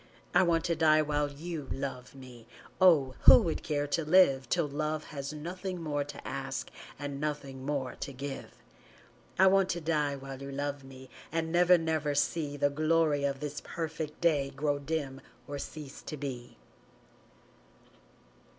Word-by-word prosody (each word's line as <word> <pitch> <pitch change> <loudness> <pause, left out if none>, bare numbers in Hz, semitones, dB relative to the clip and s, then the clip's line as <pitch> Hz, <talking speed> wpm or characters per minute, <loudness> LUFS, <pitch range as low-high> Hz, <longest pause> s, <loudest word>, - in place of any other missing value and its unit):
I - - +6
want 170 -3 +2
to 170 - +1
die 155 -1 +4
while 145 -1 0
you 155 0 -6
love 135 -2 -5
me 125 -4 -12 0.3
Oh, 150 -8 +6
who - - +11
would 165 - -2
care 145 -2 -1
to 165 - 0
live 150 -6 +4
Till 170 -4 +1
love 155 +2 -2
has 140 -1 -4
nothing 180 +4 -5
more 145 -3 -1
to 145 0 -9
ask - - -4 0.3
And 145 -1 -5
nothing 140 -3 -4
more 135 -4 -2
to - - -6
give! 135 +1 -6 0.9
I 190 - +6
want 190 0 +4
to 170 - -1
die 150 -3 0
while 135 0 -8
you 140 0 -6
love 140 0 -3
me 130 -1 -13 0.2
And 160 0 -1
never, 180 +1 +6
never 160 -3 -1
see 145 0 0
The 145 0 +2
glory 155 -1 +2
of 140 0 -2
this 150 0 -4
perfect 160 -2 -5
day 150 -5 +2
Grow 145 +1 -1
dim 140 -2 -3 0.3
or 145 0 -5
cease 145 -1 -8
to 155 - -6
be. 130 -4 -6
145 Hz, 160 wpm, -30 LUFS, 140-160 Hz, 0.9 s, who